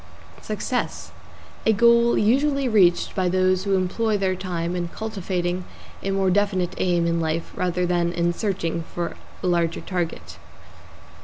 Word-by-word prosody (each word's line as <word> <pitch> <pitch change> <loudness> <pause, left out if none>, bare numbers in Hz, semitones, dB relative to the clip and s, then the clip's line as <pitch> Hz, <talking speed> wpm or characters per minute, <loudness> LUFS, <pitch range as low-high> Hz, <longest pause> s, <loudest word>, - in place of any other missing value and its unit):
=SUCCESS= - - -3 0.6
A 220 - +5
goal 235 +2 +5
usually 275 +5 +2
reached 190 -7 +3
by 185 -2 +1
those 185 +1 +2
who 200 -1 +2
employ 205 +4 0
their 190 -1 0
time 175 -2 -3
in 175 -1 -2
cultivating 185 -3 -3 0.4
a 195 - -3
more 195 -1 +2
definite 190 -2 +1
aim 175 -2 +2
in 170 0 +1
life 160 +1 -2
rather 180 0 0
than 175 -1 +1
in 175 0 0
searching 170 -4 -2
for 175 -1 -3 0.3
a - - -1
larger 170 -2 +1
target. 175 -3 -4
185 Hz, 145 wpm, -23 LUFS, 175-205 Hz, 0.6 s, A